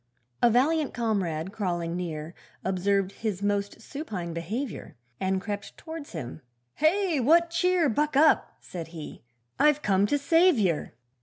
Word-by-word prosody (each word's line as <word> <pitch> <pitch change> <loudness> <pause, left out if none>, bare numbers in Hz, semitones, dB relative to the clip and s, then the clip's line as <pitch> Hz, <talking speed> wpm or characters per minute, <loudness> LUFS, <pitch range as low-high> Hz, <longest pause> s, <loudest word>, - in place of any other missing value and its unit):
A 240 - +6
valiant 285 +6 +2
comrade 190 -8 -1
crawling 175 -5 -2
near 165 -2 -4 0.3
Observed 195 +1 +1
his 200 -3 -4
most 205 +1 -1
supine 210 - -5
behaviour, 210 +10 -5 0.2
And 190 0 0
crept 205 +1 -6
towards 320 -2 -8
him, 135 -8 -6 0.3
'Hey! 335 0 +2
what 335 +7 +4
cheer? 360 -1 +2
Buck 295 +4 0
up,' 310 +3 +4
said 170 -3 -7
he, 165 -2 -9 0.4
'I've 300 0 +4
come 195 0 +3
to 290 - +2
save 330 +3 +4
yer. 180 -7 0
210 Hz, 140 wpm, -27 LUFS, 180-300 Hz, 0.4 s, A